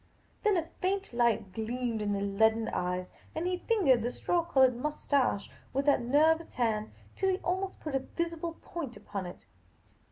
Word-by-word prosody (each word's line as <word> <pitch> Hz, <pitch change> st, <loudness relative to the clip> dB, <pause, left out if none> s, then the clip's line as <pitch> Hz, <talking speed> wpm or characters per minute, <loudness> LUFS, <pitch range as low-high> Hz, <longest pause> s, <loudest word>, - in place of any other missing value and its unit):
Then 420 Hz, -4 st, +3 dB
a 330 Hz, -, 0 dB, 0.2 s
faint 390 Hz, -3 st, -1 dB
light 230 Hz, -5 st, +1 dB
gleamed 230 Hz, +1 st, -2 dB
in 205 Hz, -1 st, 0 dB
the 200 Hz, -, -1 dB
leaden 220 Hz, +3 st, +2 dB
eyes, 180 Hz, 0 st, -2 dB, 0.2 s
and 320 Hz, +2 st, -1 dB
he 360 Hz, 0 st, 0 dB
fingered 355 Hz, -, +3 dB
the 240 Hz, -, 0 dB
straw 345 Hz, +6 st, 0 dB
coloured 265 Hz, -6 st, +4 dB
moustache 275 Hz, -4 st, 0 dB, 0.3 s
with 275 Hz, +2 st, 0 dB
that 285 Hz, -3 st, +4 dB
nervous 315 Hz, +6 st, +3 dB
hand 220 Hz, -3 st, 0 dB, 0.3 s
till 385 Hz, -, +1 dB
he 370 Hz, -, +2 dB
almost 375 Hz, +2 st, -1 dB
put 305 Hz, -, -5 dB
a 270 Hz, -, +2 dB
visible 335 Hz, +3 st, -4 dB
point 295 Hz, -9 st, -5 dB
upon 195 Hz, -3 st, -5 dB
it. 175 Hz, -, -11 dB
265 Hz, 170 wpm, -31 LUFS, 220-335 Hz, 0.3 s, coloured